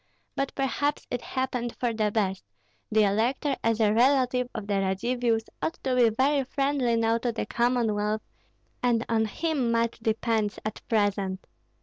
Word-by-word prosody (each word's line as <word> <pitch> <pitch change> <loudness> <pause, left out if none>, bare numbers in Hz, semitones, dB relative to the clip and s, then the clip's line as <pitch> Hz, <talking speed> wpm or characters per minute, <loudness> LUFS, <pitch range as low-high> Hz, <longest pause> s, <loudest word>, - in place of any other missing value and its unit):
But 275 0 -2
perhaps 285 +2 -1
it 245 - -2
happened 250 -2 -3
for 240 -2 -1
the 215 -1 +1
best; 200 -3 -1 0.5
the 215 0 +4
elector 240 +8 +1
as 230 -1 +1
a 210 -1 +4
relative 250 0 +3
of 215 -3 -4
the 200 -1 0
Radzivills 225 +4 0 0.2
ought 325 - -1
to 260 -1 +1
be 240 -2 +5
very 270 +5 +2
friendly 275 -2 0
now 230 0 +2
to 240 0 -1
the 225 - -3
Commonwealth, 220 -3 0 0.6
and 240 -2 +2
on 225 -1 +2
him 285 +1 -1
much 230 0 0
depends 220 -1 0
at 215 - -4
present. 200 -3 0
230 Hz, 155 wpm, -27 LUFS, 215-255 Hz, 0.6 s, be